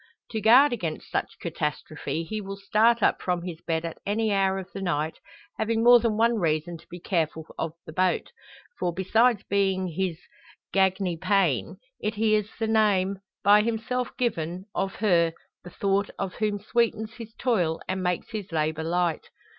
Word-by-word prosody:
To 220 - -2
guard 245 +6 +7
against 170 -9 -4
such - - -2
catastrophe 155 0 -3
he 215 +6 -4
will 195 0 -6
start 215 +3 +3
up - - +3
from 180 -2 -1
his 170 -2 -6
bed 165 0 -2
at 165 - -6
any 215 +1 0
hour 195 -1 +2
of 190 -1 -6
the 195 - -5
night, 160 -4 -1 0.4
having 225 +1 +1
more 240 0 +8
than 225 -2 0
one 230 0 +3
reason 165 0 0
to - - -20
be 175 - -9
careful 160 -3 -1
of 165 -1 -2
the 160 - -9
boat; 185 +2 +1 0.5
for, 175 - 0
besides 215 +5 +2
being 190 -2 +1
his 175 0 -2 0.6
gagne 190 -2 +2
pain, 170 - +1 0.2
it 215 +1 -2
hears 215 -1 +2
the 225 - -1
name, 200 -3 +2 0.2
by 205 +2 +7
himself 235 +3 -1
given, 180 - -2
of 195 0 -2
her 170 -6 +3 0.3
the 175 - -9
thought 200 +2 0
of 195 -2 -3
whom 210 -1 -1
sweetens 220 0 0
his 225 -1 -9
toil 180 -10 +1
and 185 0 -2
makes 180 +2 -2
his 210 -5 -5
labour 160 0 -1
light. 170 0 -1
195 Hz, 170 wpm, -26 LUFS, 170-220 Hz, 0.6 s, more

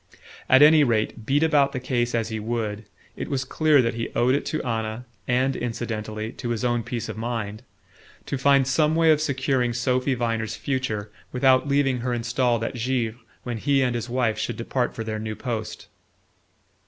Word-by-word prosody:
At 130 +2 +7
any 155 0 +7
rate, 110 -2 -1
beat 145 +3 +3
about 145 -3 +3
the 130 - -2
case 120 -2 -1
as 115 -1 -1
he 110 -1 -3
would, 110 -1 -3 0.3
it - - -5
was 135 -2 -1
clear 150 -1 +3
that 115 - 0
he 115 0 -3
owed 125 +2 +3
it 140 - -1
to 155 - -2
Anna 115 0 -3 0.2
and 130 +2 +1
incidentally 110 -2 -4
to 120 - -6
his 120 +1 -1
own 120 -1 +1
peace 115 0 -4
of - - -6
mind 110 -2 -3 0.6
to - - -3
find 140 0 +4
some 150 +4 +2
way 165 -1 +5
of 155 -1 +3
securing 130 -4 0
Sophy 125 +2 0
Viner's 115 -3 -2
future 120 -7 -3 0.2
without 130 +1 +3
leaving 140 -2 +2
her 120 0 -1
installed 120 0 0
at - - -2
Givre 120 -1 -1 0.2
when 120 -2 -4
he 140 +2 +2
and 125 -2 +1
his 120 0 -4
wife 120 -3 0
should - - -3
depart 120 +1 -2
for 115 - -4
their 110 -1 -4
new 110 0 -4
post. 115 -4 -5
120 Hz, 190 wpm, -24 LUFS, 115-135 Hz, 0.6 s, At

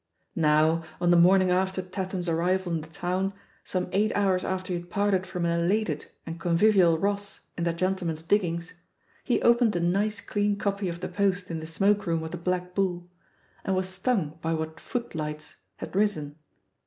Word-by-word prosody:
Now, 155 +1 +3 0.2
on 175 0 +3
the - - +6
morning 185 +2 +5
after 190 +1 +1
Tatham's 185 -1 -4
arrival 175 +2 +1
in 165 - -1
the 155 - -10
town, 180 +4 -2 0.3
some 180 -1 -2
eight 215 +3 +2
hours 190 -2 +2
after 185 0 -2
he 175 - -1
had 175 0 -13
parted 195 -1 +1
from 180 -2 -2
an 170 - +1
elated 175 -3 0 0.2
and 165 0 -6
convivial 175 0 +4
Ross 200 +2 -2
in 170 - -2
that 170 -1 0
gentle 185 0 -1
man's 160 -1 -3
"diggings," 170 -2 0 0.5
he - - +1
opened 235 -3 +4
a - - +1
nice 200 +5 +1
clean 205 0 0
copy 200 -1 -1
of 170 0 -6
The 185 - -2
Post 185 -1 0
in 165 - -3
the 160 - -7
"smoke 200 +4 +1
room" 165 -1 0
of 160 - -6
the 175 - -4
Black 180 +1 -2
Bull 180 -2 -1 0.5
and 190 - 0
was 185 0 -1
stung 185 - -1
by 165 0 0
what 160 0 -4
"Footlights" 155 - -5 0.2
had - - -8
written. 190 -8 0
180 Hz, 190 wpm, -27 LUFS, 170-195 Hz, 0.5 s, the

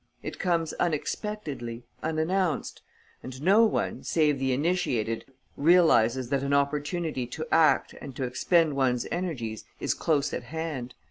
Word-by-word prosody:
It - - -6
comes 170 -3 0
unexpectedly, 150 - -3 0.2
unannounced; 160 +3 -1 0.4
and 130 0 -8
no 195 +9 +5
one, 220 - -1
save 150 -4 +2
the 135 0 0
initiated, 125 -7 0 0.3
realizes 135 -7 +4
that 140 -1 +1
an 140 +1 +1
opportunity 145 -1 -1
to 155 +6 -5
act 160 -1 +4
and 135 -3 -8
to 135 - -3
expend 155 +5 +2
one's 125 -3 +1
energies 135 - -3 0.2
is - - 0
close 150 -3 0
at - - -2
hand. 155 -6 -5
150 Hz, 135 wpm, -27 LUFS, 130-165 Hz, 0.4 s, no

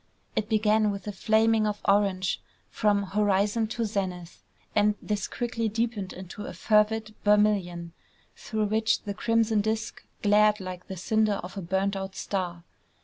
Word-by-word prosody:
It 210 - -1
began 215 -1 +3
with 200 -1 -4
a 210 - -3
flaming 220 +2 +2
of 210 0 -2
orange 195 -2 +2 0.3
from 205 -1 +2
horizon 205 +2 +1
to 230 +1 -2
zenith; 185 -5 -4 0.3
and 210 0 +3
this 205 -2 -2
quickly 230 -2 -2
deepened 220 -3 -2 0.2
to 210 - -7
a - - -6
fervid 215 0 +2
vermilion, 200 -5 +2 0.4
through 215 -2 -2
which 220 +1 +1
the 205 - -4
crimson 225 0 +2
disk 220 +1 -3 0.2
glared 210 +1 +4
like 185 -1 -7
the 190 - -6
cinder 215 +2 +1
of 180 - -8
a 195 - -4
burnt 190 +3 0
out 190 0 -5
star. 180 -4 -3
210 Hz, 150 wpm, -27 LUFS, 195-220 Hz, 0.4 s, glared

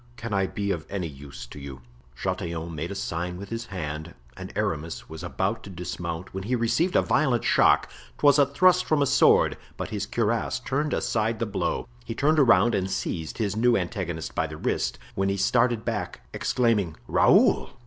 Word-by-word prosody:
Can 115 -2 -5
I 95 -1 +2
be 100 0 -2
of 80 -5 -3
any 95 -3 -3
use 70 -4 -9
to 60 - -11
you?" 70 -2 -9 0.3
Chatillon 85 -1 -3
made 80 +2 -4
a 100 - -5
sign 90 -1 -3
with 100 +1 -8
his 115 +1 -5
hand 80 -5 -5 0.2
and - - -8
Aramis 80 +1 -2
was 80 0 -8
about 95 +5 -2
to 100 - -10
dismount 85 -1 -5
when 95 0 -5
he 125 +4 +1
received 120 +10 +1
a - - +5
violent 130 -7 +2
shock; - - +4 0.3
'twas 145 0 +5
a 140 - +5
thrust 180 +6 +4
from 150 -2 +2
a - - +2
sword, 140 +1 +4 0.2
but - - -4
his 100 -2 -3
cuirass 115 +3 0
turned 145 +4 -1
aside 110 0 0
the 115 - -1
blow. 105 +2 -2 0.2
He 115 -1 -6
turned 150 +5 +3
around 120 -3 +5
and 95 -2 0
seized 80 -4 -3
his 105 -3 -1
new 120 +2 +3
antagonist 85 -8 -3
by - - 0
the - - -8
wrist, - - -1 0.2
when 95 0 0
he 100 - 0
started 120 +2 +2
back, - - -3
exclaiming, 105 -9 +1
"Raoul!" - - +4
100 Hz, 190 wpm, -26 LUFS, 85-120 Hz, 0.3 s, a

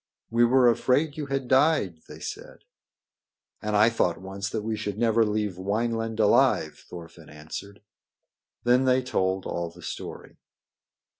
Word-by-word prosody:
"We 120 +1 +4
were 125 +1 +4
afraid 130 +6 +2
you 150 -2 -5
had 135 -2 -2
died," 130 - +2
they - - -11
said. - - -8 1.0
"And 105 0 -2
I 110 +3 +5
thought 90 -7 0
once 95 +1 -5
that 105 - -3
we 110 0 -2
should 105 -2 -4
never 115 0 +3
leave 105 -3 -2
Wineland 115 +3 -2
alive," 105 -2 +3
Thorfinn 85 -2 -11
answered. 80 +7 -9 0.8
Then 125 +2 +3
they 130 0 +3
told 95 -6 -1
all 85 -1 -3
the 85 +1 -15
story. - - -8
110 Hz, 145 wpm, -26 LUFS, 95-125 Hz, 1.0 s, I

